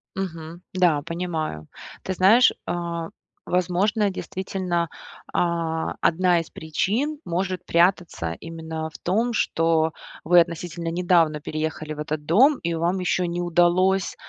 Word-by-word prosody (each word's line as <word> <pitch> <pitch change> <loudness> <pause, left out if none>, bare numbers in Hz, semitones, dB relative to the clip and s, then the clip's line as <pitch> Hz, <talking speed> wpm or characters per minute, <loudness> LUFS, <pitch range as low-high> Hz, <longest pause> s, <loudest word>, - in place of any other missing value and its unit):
Мгм. 170 -3 -6
Да, 175 -5 +3
понимаю. 160 - -4 0.4
Ты 190 - -2
знаешь, 200 +7 +6 0.2
а, 170 -1 -3 0.4
возможно, 195 +4 +1
действительно, 185 -2 -3 0.5
а, 165 -2 -1
одна 175 +1 +3
из 165 - -6
причин 220 - -2
может 185 +1 -2
прятаться 170 - +1
именно 160 -1 -6
в 150 - -12
том, 225 +7 0
что 165 -5 +1 0.3
вы 175 +2 +6
относительно 170 0 -2
недавно 170 -3 +2
переехали 155 0 -4
в 150 - -10
этот 150 -1 -4
дом, 260 - +5
и 170 0 -1
вам 170 +3 0
еще 180 0 0
не 170 +1 -2
удалось, 175 +2 +2
170 Hz, 125 wpm, -24 LUFS, 160-185 Hz, 0.5 s, знаешь